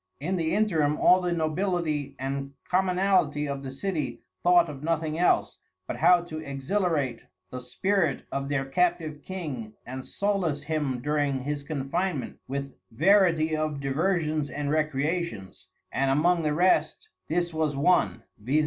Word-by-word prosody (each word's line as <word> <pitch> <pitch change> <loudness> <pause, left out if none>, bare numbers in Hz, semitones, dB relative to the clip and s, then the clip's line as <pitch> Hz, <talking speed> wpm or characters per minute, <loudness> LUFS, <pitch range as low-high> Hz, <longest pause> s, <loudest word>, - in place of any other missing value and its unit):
In 175 +7 -1
the 165 0 0
interim 160 -9 +2
all 185 +1 +5
the 180 -1 -1
Nobility 160 -3 -1
and 140 +1 -4
Commonality 180 -5 +2
of 140 -1 -3
the 135 - -6
City 155 +4 -3 0.2
thought 175 -1 +5
of 145 -3 -8
nothing 160 0 -1
else, 180 - +2 0.3
but - - -4
how 180 -1 +5
to 155 -2 -6
exhilarate 145 - -1 0.3
the 125 - -5
Spirit 165 +4 0
of 140 0 -3
their 140 -2 0
Captive 165 0 0
King, 145 - -6
and 130 +1 -6
solace 185 -8 -1
him 145 -5 -2
during 145 -3 0
his 145 +1 -2
Confinement 150 +2 -3
with 140 0 -4 0.2
varity 165 - +3
of 155 -2 -2
diversions 155 +1 0
and 145 -1 -3
Recreations; 155 - -2 0.2
and 135 0 +1
among 170 +5 +3
the 150 -1 0
rest 185 - +2 0.2
this 175 +1 0
was 155 -3 0
one, 145 -6 +2 0.2
_viz. 135 +7 +2
155 Hz, 145 wpm, -27 LUFS, 140-175 Hz, 0.3 s, all